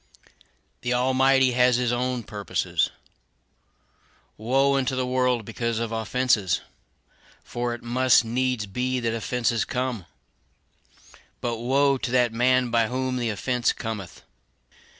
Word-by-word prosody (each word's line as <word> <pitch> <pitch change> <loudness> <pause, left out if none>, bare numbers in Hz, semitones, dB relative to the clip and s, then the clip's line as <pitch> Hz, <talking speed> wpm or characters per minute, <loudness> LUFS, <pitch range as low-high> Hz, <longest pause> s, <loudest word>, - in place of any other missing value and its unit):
The 125 0 0
Almighty 130 +1 +3
has 125 0 +3
his 125 -1 0
own 125 0 -1
purposes. 100 -3 -1 1.5
"Woe 135 +5 +2
unto 130 -1 0
the 130 0 -1
world 125 -2 0
because 115 +1 -3
of 115 0 -3
offenses! 110 -3 +1 0.8
for 120 0 -3
it 120 - -13
must 125 0 +3
needs 125 -1 -1
be 125 +6 -2
that 115 -2 -1
offenses 115 0 0
come; 125 -8 -3 1.3
but 120 -1 -2
woe 135 +3 +2
to - - -3
that 125 -2 +2
man 125 +1 +2
by 115 -1 +3
whom 130 +1 -2
the 120 -2 -1
offense 120 +4 0
cometh." 105 -6 -7
125 Hz, 125 wpm, -25 LUFS, 115-130 Hz, 1.5 s, Almighty